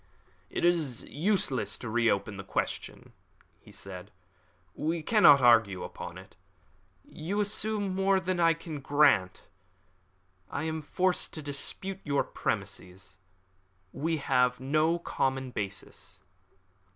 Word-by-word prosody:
"It - - -1
is 160 -9 +1
useless 165 - 0
to 120 - -7
reopen 110 -3 0
that 95 - -9
question," - - -4 0.5
he - - -17
said. 90 -2 -8 0.6
"We 160 +1 -2
cannot 150 - +6
argue 115 -7 +4
upon - - -8
it. - - -14 0.7
You 180 +7 -4
assume 205 -1 +1
more 195 0 +2
than 185 -1 -2
I 165 -1 +4
can 160 -2 -7
grant. 140 -10 +3 1.1
I 140 - -3
am 160 0 -3
forced 185 +5 0
to 155 - -6
dispute 185 +7 -3
your 140 -2 +1
premises. 95 +1 -5 0.7
We 160 +4 -1
have 125 -3 +1
no 155 +5 +1
common 135 -5 -2
basis." 100 -3 -6
145 Hz, 115 wpm, -29 LUFS, 120-175 Hz, 1.1 s, cannot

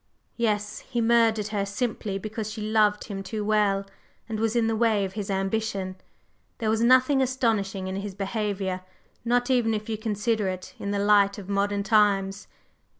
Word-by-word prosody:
"Yes. 210 -2 -1
He 245 -2 -4
murdered 225 -2 +3
her 205 -2 -1
simply 205 -1 -2
because 215 +1 -5
she 220 - -7
loved 210 -1 +2
him 200 -3 -6
too 210 +2 -4
well 205 -2 +2 0.4
and 220 -2 -4
was 225 +1 0
in 235 -1 +3
the 225 0 +1
way 220 -3 +2
of 190 - -6
his 205 -1 -5
ambition. 195 -1 -1 0.6
There 220 -1 0
was 220 0 +1
nothing 255 +3 +5
astonishing 220 -7 0
in 190 0 -3
his 200 -1 -5
behavior, 195 -2 -2 0.4
not 245 +2 +1
even 230 -3 +2
if 210 +1 -5
you 220 -1 -2
consider 220 -1 0
it 185 -1 -5
in 200 - -4
the 200 - 0
light 200 0 +4
of 200 -2 -9
modern 200 0 0
times. 200 -2 +2
210 Hz, 175 wpm, -26 LUFS, 200-225 Hz, 0.6 s, nothing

